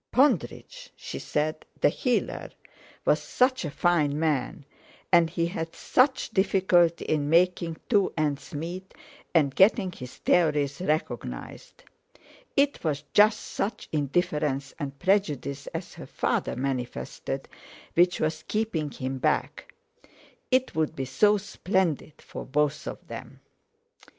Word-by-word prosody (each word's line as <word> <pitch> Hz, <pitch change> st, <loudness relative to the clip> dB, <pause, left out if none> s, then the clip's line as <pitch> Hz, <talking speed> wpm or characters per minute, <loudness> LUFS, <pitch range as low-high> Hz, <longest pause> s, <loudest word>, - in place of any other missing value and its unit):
Pondridge—she 295 Hz, -, 0 dB
said—the 155 Hz, 0 st, -1 dB
healer, 245 Hz, -, -1 dB, 0.6 s
was -, -, +3 dB
such 255 Hz, -2 st, +1 dB
a 155 Hz, -, -2 dB
fine 150 Hz, -2 st, +2 dB
man, 150 Hz, -2 st, -1 dB, 0.5 s
and 170 Hz, -2 st, +6 dB
he 170 Hz, 0 st, 0 dB
had 165 Hz, -1 st, -4 dB
such 260 Hz, -1 st, +2 dB
difficulty 185 Hz, -4 st, +3 dB
in 145 Hz, -2 st, 0 dB
making 170 Hz, 0 st, +2 dB
two 205 Hz, -4 st, +3 dB
ends 150 Hz, -3 st, -1 dB
meet, 175 Hz, +5 st, -6 dB, 0.4 s
and 145 Hz, -5 st, +4 dB
getting 190 Hz, -, +4 dB
his 125 Hz, -7 st, -9 dB
theories 150 Hz, -4 st, +2 dB
recognised. 170 Hz, -, -4 dB, 0.7 s
It 280 Hz, 0 st, +2 dB
was 150 Hz, -3 st, -1 dB
just 210 Hz, +1 st, +5 dB
such 210 Hz, +1 st, -4 dB
indifference 150 Hz, -2 st, 0 dB
and 140 Hz, -2 st, -5 dB
prejudice 150 Hz, -7 st, 0 dB
as -, -, -6 dB
her -, -, -10 dB
father -, -, -1 dB
manifested 125 Hz, -, -4 dB, 0.5 s
which 175 Hz, +1 st, +3 dB
was 155 Hz, 0 st, -1 dB
keeping 210 Hz, -9 st, -1 dB
him 130 Hz, -1 st, -4 dB
back. -, -, -1 dB, 0.8 s
It 255 Hz, 0 st, +2 dB
would 160 Hz, 0 st, 0 dB
be 135 Hz, -, -3 dB
so 210 Hz, +10 st, +3 dB
splendid 185 Hz, -6 st, -1 dB
for -, -, -7 dB
both 150 Hz, +1 st, 0 dB
of -, -, -7 dB
them! -, -, -9 dB
165 Hz, 120 wpm, -27 LUFS, 145-190 Hz, 0.8 s, and